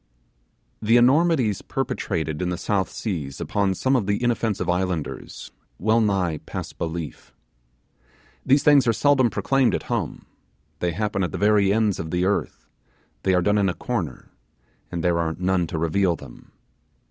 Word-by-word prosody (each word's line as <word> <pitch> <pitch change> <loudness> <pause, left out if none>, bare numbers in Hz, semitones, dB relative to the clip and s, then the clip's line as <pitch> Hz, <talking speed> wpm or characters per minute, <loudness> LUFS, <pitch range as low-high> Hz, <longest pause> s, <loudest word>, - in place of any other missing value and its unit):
The 115 +2 +4
enormities 130 - +3
perpetrated 80 - -3
in 90 - -1
the 90 - -2
South 95 -3 -1
Seas 75 -11 -4
upon 100 -2 0
some 130 +6 +1
of 110 -7 0
the 100 +4 0
inoffensive 115 -6 0
islanders 90 -3 -3 0.3
will 110 +5 +2
nigh 95 -7 0
pass - - -6
belief. 80 -2 -6 1.1
These 135 +2 +3
things 145 -4 +5
are 115 - +4
seldom 130 +2 +3
proclaimed 125 +6 +1
at - - -3
home; - - -3 0.5
they 85 -1 -1
happen 105 +1 -1
at 90 - -2
the - - -4
very 105 -1 +3
ends 105 -2 +1
of 80 - -4
the 90 +2 0
earth; 100 +1 -2 0.5
they 95 -1 +2
are 90 - +2
done 105 +2 +2
in 100 -1 +2
a 90 - -3
corner, 90 - -4 0.6
and 85 -2 -3
there 85 -1 +2
are 80 -1 -1
none 90 -1 +1
to 80 - -4
reveal 85 +3 +1
them. 70 -6 -13
95 Hz, 160 wpm, -23 LUFS, 85-115 Hz, 1.1 s, things